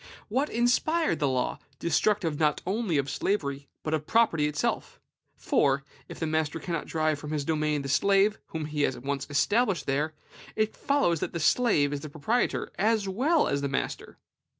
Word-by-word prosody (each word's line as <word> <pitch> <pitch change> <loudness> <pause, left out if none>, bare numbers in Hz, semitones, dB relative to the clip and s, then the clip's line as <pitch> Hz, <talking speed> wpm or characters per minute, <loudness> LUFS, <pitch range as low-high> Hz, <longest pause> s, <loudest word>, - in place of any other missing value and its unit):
What 265 +7 0
inspired 245 - +1
this 145 - +2
law, 130 -1 -1 0.2
destructive 170 -1 +1
not 150 -2 +2
only 195 -3 0
of 140 -1 0
slavery, 140 -7 -2 0.2
but 155 - -2
of 155 -1 -1
property 190 -10 +3
itself? 150 0 -2 0.4
For, 140 0 +1 0.3
if - - -9
the 160 - -1
master 160 0 -1
cannot 165 0 -4
drive 155 -2 0
from 150 - -7
his 150 -2 -2
domain 150 -2 0
the - - -4
slave 200 +8 +3
whom 160 -1 -4
he 150 0 -3
has 135 - +1
once 140 +2 -3
established 195 - +1
there, 150 +3 -1 0.4
it 215 0 0
follows 275 - +1
that - - -3
the 170 - -2
slave 155 -6 +3
is 145 - -2
proprietor, 155 +12 -1
as 215 0 +2
well 275 - +2
as 140 - 0
the 140 - -1
master. 135 - -3
155 Hz, 175 wpm, -28 LUFS, 145-210 Hz, 0.4 s, property